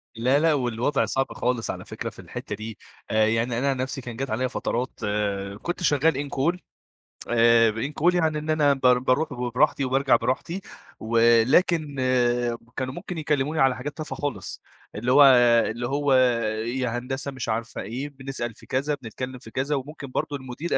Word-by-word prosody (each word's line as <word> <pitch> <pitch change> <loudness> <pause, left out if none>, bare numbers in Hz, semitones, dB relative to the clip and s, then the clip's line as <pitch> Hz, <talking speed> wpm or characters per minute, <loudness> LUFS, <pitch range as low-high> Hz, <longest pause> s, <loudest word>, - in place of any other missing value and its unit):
لا، 125 +5 +2
لا، 160 0 +3
والوضع 125 +1 0
صعب 135 0 0
خالص 125 -2 -1
على - - -8
فكرة - - -5
في - - -17
الحتة 105 - -6
دي. 110 0 -8 0.3
آآ، 110 0 +4
يعني 115 +2 0
أنا 140 +2 +1
عن 135 - 0
نفسي 130 +2 -3
كان 120 -2 -7
جات 135 +3 -4
عليا 125 +4 0
فترات 125 0 -3 0.6
كنت 175 +1 -4
شغال 145 -2 +2
incall 150 +7 0 0.7
آآ، 115 -1 +5
incall 145 +10 0
يعني 160 -3 +1
إن 155 +1 -7
أنا 150 -2 +4
بار 125 -2 +3
باروح 135 +4 +1
براحتي 125 +3 +1
وبارجع 135 +1 +3
براحتي، 165 +8 -2 0.4
ولكن 120 +8 +3 0.8
كانوا 130 0 -2
ممكن 175 +4 -7
يكلموني 150 0 0
على 135 -1 +4
حاجات 145 +6 -6
تافهة 155 -1 -5
خالص، 110 -11 -4 0.3
اللي 120 +4 -1
هو 145 +2 +8 0.5
اللي 120 +2 -3
هو 140 +1 +1 0.5
يا 120 0 -2
هندسة 135 +2 -4
مش 130 -3 -5
عارفة 115 +2 -3
إيه، 125 +8 -5
بنسأل 135 -4 -5
في - - -16
كذا، 140 +3 -1
بنتكلم 125 +2 -6
في 115 -2 -13
كذا، 135 +4 -1
وممكن 140 +1 -6
برضه 145 - -2
المدير 130 +5 -3
130 Hz, 170 wpm, -25 LUFS, 120-145 Hz, 0.8 s, هو